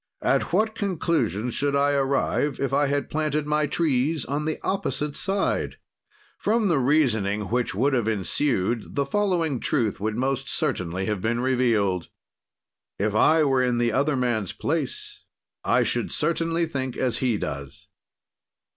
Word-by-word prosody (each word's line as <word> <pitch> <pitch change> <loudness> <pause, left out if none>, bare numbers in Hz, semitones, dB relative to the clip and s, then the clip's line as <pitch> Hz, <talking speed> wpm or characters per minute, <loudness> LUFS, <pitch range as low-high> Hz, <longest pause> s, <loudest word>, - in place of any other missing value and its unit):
"At - - +1
what 215 +5 +2
conclusions 165 - -1
should 140 0 0
I 140 +1 +3
arrive, 140 0 0
if 135 0 -1
I 145 +1 +3
had 140 +1 -1
planted 155 -1 -1
my 150 0 +1
trees 145 -1 +1
on 145 +3 -2
the 155 - -1
opposite 150 -6 -2
side?" 195 +1 -1 0.6
From 220 -1 +1
the 160 -5 +3
reasoning 110 -8 +1
which 120 -4 0
would 135 +7 +2
have 120 -4 +1
ensued, 110 - 0
the 140 - +1
following 170 -5 0
truth 115 -8 0
would 105 +2 -2
most 135 +1 -1
certainly 90 +1 -1
have 105 -2 -2
been 120 +3 0
revealed. 115 -8 +1 0.9
"If 105 +1 0
I 155 +9 +4
were 135 -3 +2
in 125 -1 +1
the 120 0 +2
other 140 +5 +1
man's 120 -7 -1
place, - - -3 0.4
I - - +3
should - - -1
certainly 165 0 0
think 130 -5 -4
as 125 -2 0
he 125 -5 +1
does." 70 -5 -6
135 Hz, 150 wpm, -25 LUFS, 115-150 Hz, 0.9 s, I